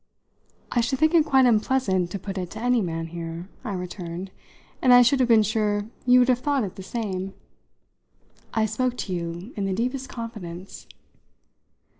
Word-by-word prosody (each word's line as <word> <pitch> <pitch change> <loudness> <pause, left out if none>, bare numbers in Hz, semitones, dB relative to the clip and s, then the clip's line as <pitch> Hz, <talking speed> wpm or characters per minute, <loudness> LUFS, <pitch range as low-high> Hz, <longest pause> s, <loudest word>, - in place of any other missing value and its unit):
"I 240 - +2
should 265 +3 0
think 315 +4 +3
it 330 -2 +6
quite 265 -3 +5
unpleasant 215 -6 +2
to 200 - -4
put 195 0 -5
it 180 -1 -4
to 220 - -7
any 245 0 +2
man 165 -3 -3
here," 165 +2 -6
I 220 -5 -4
returned; 180 0 -6 0.5
"and 255 - +5
I 245 0 +9
should 260 +3 +3
have 250 -2 +2
been 225 -2 +6
sure 210 -1 0 0.2
you 250 0 +7
would 250 0 +5
have 250 -1 +3
thought 280 -1 +1
it 190 - -5
the - - -8
same. 195 -2 -4 1.2
I 220 - +1
spoke 245 +3 -1
to 185 - -4
you 175 +5 -5
in 200 - -2
the 195 - -1
deepest 255 +4 -2
confidence." 195 -6 -8
215 Hz, 180 wpm, -25 LUFS, 185-250 Hz, 1.2 s, I